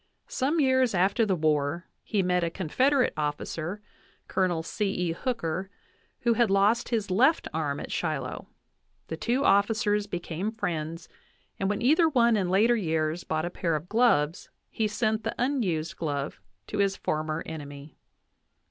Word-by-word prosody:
Some 305 Hz, -, 0 dB
years 260 Hz, -5 st, +3 dB
after 195 Hz, +5 st, +2 dB
the 190 Hz, -, +2 dB
war 155 Hz, +1 st, 0 dB, 0.2 s
he 205 Hz, -4 st, 0 dB
met 180 Hz, -1 st, +1 dB
a 170 Hz, -, +1 dB
Confederate 255 Hz, -, +1 dB
officer, 155 Hz, +6 st, -3 dB, 0.4 s
Col. 175 Hz, -4 st, 0 dB
C. 210 Hz, +5 st, -2 dB
E. 180 Hz, -3 st, -1 dB
Hooker, 190 Hz, -3 st, -3 dB, 0.5 s
who 235 Hz, -1 st, +3 dB
had 235 Hz, -2 st, +2 dB
lost 200 Hz, +4 st, +3 dB
his 220 Hz, -5 st, -1 dB
left 260 Hz, -, +3 dB
arm 150 Hz, -3 st, -1 dB
at -, -, -7 dB
Shiloh; 150 Hz, -6 st, -3 dB, 0.6 s
the 160 Hz, -, -3 dB
two 250 Hz, -, 0 dB
officers 205 Hz, 0 st, +2 dB
became 175 Hz, +3 st, -4 dB
friends, 165 Hz, -5 st, -4 dB, 0.5 s
and 195 Hz, -, 0 dB
when 205 Hz, +3 st, -1 dB
either 320 Hz, +6 st, +5 dB
one 235 Hz, -5 st, +4 dB
in 190 Hz, -4 st, 0 dB
later 215 Hz, +6 st, +4 dB
years 160 Hz, -4 st, -1 dB
bought 155 Hz, +1 st, -1 dB
a 175 Hz, -, -4 dB
pair 170 Hz, -3 st, -1 dB
of 155 Hz, +3 st, -4 dB
gloves 185 Hz, -9 st, +2 dB, 0.2 s
he 220 Hz, -, 0 dB
sent 215 Hz, +1 st, -1 dB
the 225 Hz, -, -3 dB
unused 210 Hz, -, -1 dB
glove 145 Hz, -3 st, -3 dB, 0.3 s
to 210 Hz, -, -4 dB
his 195 Hz, -1 st, +2 dB
former 155 Hz, +1 st, -2 dB
enemy. 145 Hz, -2 st, -8 dB
190 Hz, 155 wpm, -27 LUFS, 160-225 Hz, 0.6 s, either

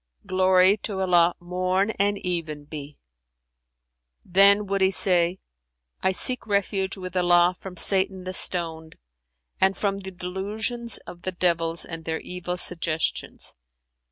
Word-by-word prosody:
Glory 185 Hz, +1 st, +4 dB
to 200 Hz, -2 st, -6 dB
Allah 175 Hz, -2 st, +3 dB
morn 185 Hz, +3 st, -1 dB
and 205 Hz, 0 st, +1 dB
even 160 Hz, -5 st, -4 dB
be!' 145 Hz, -1 st, -9 dB, 1.3 s
Then 200 Hz, +3 st, +5 dB
would 195 Hz, 0 st, -2 dB
he 190 Hz, -, +4 dB
say, 180 Hz, -2 st, +4 dB, 0.6 s
'I 190 Hz, -, +2 dB
seek 250 Hz, +5 st, +3 dB
refuge 200 Hz, -1 st, -1 dB
with 185 Hz, -1 st, -8 dB
Allah 175 Hz, 0 st, +3 dB
from 185 Hz, -2 st, -10 dB
Satan 190 Hz, 0 st, +2 dB
the 185 Hz, 0 st, -6 dB
Stoned 165 Hz, -3 st, -1 dB, 0.6 s
and 190 Hz, 0 st, +2 dB
from 195 Hz, -1 st, -1 dB
the 190 Hz, -1 st, -8 dB
delusions 205 Hz, +6 st, -3 dB
of 175 Hz, -, -11 dB
the 185 Hz, -, -3 dB
Devils 170 Hz, -2 st, 0 dB
and 165 Hz, -1 st, -8 dB
their 160 Hz, 0 st, -3 dB
evil 180 Hz, 0 st, -6 dB
suggestions.' 165 Hz, -3 st, -1 dB
185 Hz, 130 wpm, -24 LUFS, 175-195 Hz, 1.3 s, Then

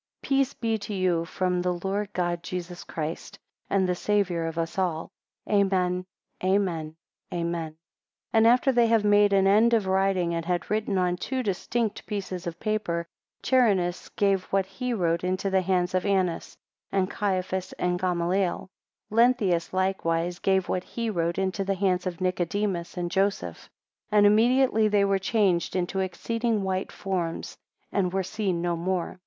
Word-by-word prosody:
Peace 275 Hz, -1 st, +1 dB
be 225 Hz, -2 st, -1 dB
to 205 Hz, +1 st, -5 dB
you 180 Hz, -3 st, +1 dB
from 180 Hz, 0 st, -1 dB
the 180 Hz, 0 st, 0 dB
Lord 200 Hz, +1 st, -2 dB
God 175 Hz, -1 st, -1 dB
Jesus 175 Hz, 0 st, -6 dB
Christ, 160 Hz, 0 st, -5 dB, 0.3 s
and 195 Hz, -1 st, +2 dB
the 180 Hz, -, +1 dB
Saviour 180 Hz, -3 st, 0 dB
of 165 Hz, 0 st, -5 dB
us 165 Hz, +3 st, -2 dB
all. 170 Hz, -4 st, -1 dB, 0.4 s
Amen, 185 Hz, -3 st, +1 dB, 0.4 s
Amen, 180 Hz, -5 st, 0 dB, 0.4 s
Amen. 170 Hz, -1 st, -2 dB
7 155 Hz, -, -29 dB, 0.6 s
And 225 Hz, 0 st, +5 dB
after 250 Hz, +3 st, +4 dB
they 240 Hz, -2 st, +4 dB
had 225 Hz, -2 st, +3 dB
made 205 Hz, 0 st, +5 dB
an 195 Hz, -1 st, +4 dB
end 220 Hz, +4 st, +5 dB
of 215 Hz, -4 st, +1 dB
writing, 190 Hz, -2 st, +1 dB
and 165 Hz, 0 st, -2 dB
had 175 Hz, +2 st, -2 dB
written 210 Hz, -2 st, 0 dB
on 180 Hz, -1 st, +1 dB
two 260 Hz, +7 st, -2 dB
distinct 215 Hz, +2 st, -2 dB
pieces 185 Hz, -4 st, -4 dB
of 170 Hz, 0 st, -5 dB
paper, 210 Hz, -6 st, -1 dB, 0.4 s
Charinus 200 Hz, -9 st, +2 dB
gave 195 Hz, -2 st, +2 dB
what 195 Hz, -1 st, 0 dB
he 195 Hz, +7 st, -4 dB
wrote 170 Hz, -6 st, 0 dB
into 185 Hz, +2 st, -1 dB
the 190 Hz, 0 st, +3 dB
hands 180 Hz, -1 st, 0 dB
of 185 Hz, -, +1 dB
Annas, 190 Hz, -4 st, -1 dB, 0.3 s
and 190 Hz, -1 st, +1 dB
Caiaphas, 190 Hz, -2 st, -2 dB
and 180 Hz, 0 st, -1 dB
Gamaliel. 180 Hz, +1 st, 0 dB, 0.4 s
8 -, -, -6 dB
Lenthius 225 Hz, -8 st, +3 dB
likewise 180 Hz, -2 st, 0 dB
gave 190 Hz, -1 st, +1 dB
what 180 Hz, -, -1 dB
he 230 Hz, +2 st, -3 dB
wrote 170 Hz, -3 st, -1 dB
into 190 Hz, 0 st, -1 dB
the 195 Hz, 0 st, -1 dB
hands 185 Hz, -1 st, 0 dB
of 175 Hz, -2 st, -4 dB
Nicodemus 185 Hz, 0 st, -1 dB
and 175 Hz, -1 st, -2 dB
Joseph; 195 Hz, +2 st, -1 dB, 0.4 s
and 210 Hz, -1 st, +5 dB
immediately 225 Hz, +1 st, +4 dB
they 205 Hz, -1 st, +3 dB
were 195 Hz, -1 st, +2 dB
changed 190 Hz, -4 st, +1 dB
into 185 Hz, +1 st, -1 dB
exceeding 220 Hz, +4 st, -1 dB
white 190 Hz, 0 st, -2 dB
forms 180 Hz, -4 st, -3 dB, 0.4 s
and 185 Hz, -3 st, 0 dB
were 190 Hz, +1 st, 0 dB
seen 185 Hz, -3 st, -2 dB
no 175 Hz, -1 st, 0 dB
more. 180 Hz, +1 st, -2 dB
190 Hz, 165 wpm, -26 LUFS, 175-205 Hz, 0.6 s, And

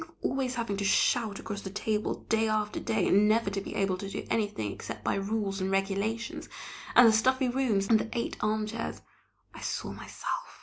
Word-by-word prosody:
Think 320 Hz, -, -8 dB
of -, -, -2 dB
always 260 Hz, -1 st, -1 dB
having 230 Hz, -4 st, -2 dB
to 200 Hz, -, -2 dB
shout 215 Hz, +1 st, +2 dB
across 205 Hz, -2 st, -5 dB
the 195 Hz, -, -6 dB
table, 210 Hz, +2 st, -1 dB
day 220 Hz, 0 st, +2 dB
after 215 Hz, -1 st, 0 dB
day, 215 Hz, -4 st, 0 dB
and 205 Hz, +2 st, +5 dB
never 220 Hz, -2 st, +2 dB
to 195 Hz, 0 st, -2 dB
be -, -, -7 dB
able 195 Hz, -2 st, +1 dB
to 195 Hz, -, -5 dB
do -, -, -5 dB
anything 205 Hz, -, 0 dB
except 105 Hz, -, -7 dB
by -, -, +1 dB
rules 195 Hz, -1 st, -1 dB
and 190 Hz, -, 0 dB
regulations; 200 Hz, +4 st, -1 dB, 0.5 s
and 245 Hz, -1 st, +9 dB
the 220 Hz, -, +6 dB
stuffy 260 Hz, +3 st, +3 dB
rooms 240 Hz, -6 st, +1 dB
and 220 Hz, 0 st, +5 dB
the 225 Hz, -, -3 dB
eight 235 Hz, -, -2 dB
armchairs! 215 Hz, +1 st, -2 dB, 0.5 s
I -, -, -10 dB
saw -, -, -3 dB
myself! -, -, -5 dB
215 Hz, 205 wpm, -29 LUFS, 195-230 Hz, 0.5 s, and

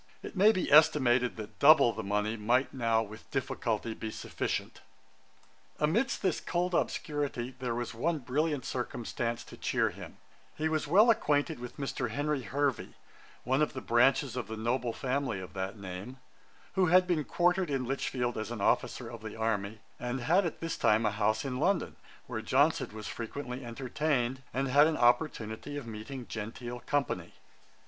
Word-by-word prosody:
It -, -, -8 dB
maybe 200 Hz, 0 st, +4 dB
estimated 130 Hz, -5 st, +5 dB
that 110 Hz, -1 st, -9 dB
double 140 Hz, -5 st, +7 dB
the -, -, -4 dB
money 105 Hz, +2 st, -1 dB
might 120 Hz, +5 st, +1 dB
now 115 Hz, -3 st, +2 dB
with 110 Hz, +1 st, -12 dB
difficulty 120 Hz, -4 st, -2 dB
be 110 Hz, -, -5 dB
sufficient. -, -, -4 dB, 1.0 s
Amidst 215 Hz, -, +1 dB
this 185 Hz, -4 st, +1 dB
cold 180 Hz, +1 st, -1 dB
obscurity, 145 Hz, -7 st, -1 dB
there 125 Hz, -2 st, -2 dB
was 120 Hz, 0 st, -3 dB
one 160 Hz, +9 st, 0 dB
brilliant 145 Hz, +2 st, -1 dB
circumstance 120 Hz, -1 st, -3 dB
to -, -, -12 dB
cheer -, -, +1 dB
him; -, -, -10 dB, 0.4 s
he 155 Hz, -, 0 dB
was 155 Hz, -1 st, -1 dB
well 210 Hz, +9 st, +6 dB
acquainted 150 Hz, -, +1 dB
with 125 Hz, 0 st, -8 dB
Mr. 135 Hz, -3 st, -2 dB
Henry 145 Hz, +3 st, -1 dB
Hervey, 140 Hz, 0 st, -1 dB, 0.5 s
one 130 Hz, +4 st, +1 dB
of 150 Hz, -, +1 dB
the 130 Hz, -, -4 dB
branches 130 Hz, +1 st, +3 dB
of 125 Hz, -, -3 dB
the 110 Hz, -, -6 dB
noble 120 Hz, +2 st, 0 dB
family 130 Hz, -3 st, -2 dB
of 95 Hz, 0 st, -9 dB
that 95 Hz, +2 st, -4 dB
name, 100 Hz, +6 st, -7 dB, 0.6 s
who 190 Hz, -2 st, +3 dB
had 180 Hz, +2 st, +6 dB
been 175 Hz, -4 st, +1 dB
quartered 175 Hz, +2 st, +1 dB
at 135 Hz, -2 st, 0 dB
Lichfield 125 Hz, -2 st, -2 dB
as 110 Hz, -, -4 dB
an 120 Hz, -2 st, -5 dB
officer 100 Hz, -, +1 dB
of 115 Hz, -2 st, -8 dB
the 110 Hz, -1 st, -7 dB
army, 110 Hz, -2 st, -2 dB, 0.2 s
and 125 Hz, +1 st, -3 dB
had 175 Hz, +8 st, +3 dB
at 160 Hz, -, -7 dB
this 165 Hz, 0 st, -3 dB
time 110 Hz, +1 st, +3 dB
a 105 Hz, -, +2 dB
house 110 Hz, +3 st, 0 dB
in 130 Hz, -2 st, -3 dB
London, 180 Hz, +2 st, +1 dB, 0.3 s
where -, -, -4 dB
Johnson -, -, +2 dB
was 110 Hz, 0 st, -7 dB
frequently 125 Hz, +2 st, -5 dB
entertained, 130 Hz, +1 st, -1 dB
and 135 Hz, +2 st, -1 dB
had 145 Hz, +4 st, +6 dB
an 160 Hz, -, 0 dB
opportunity 120 Hz, 0 st, +1 dB
of 140 Hz, -, -6 dB
meeting 115 Hz, +4 st, -7 dB
genteel 120 Hz, +3 st, -6 dB
company. 120 Hz, -12 st, -2 dB
125 Hz, 170 wpm, -31 LUFS, 115-150 Hz, 1.0 s, double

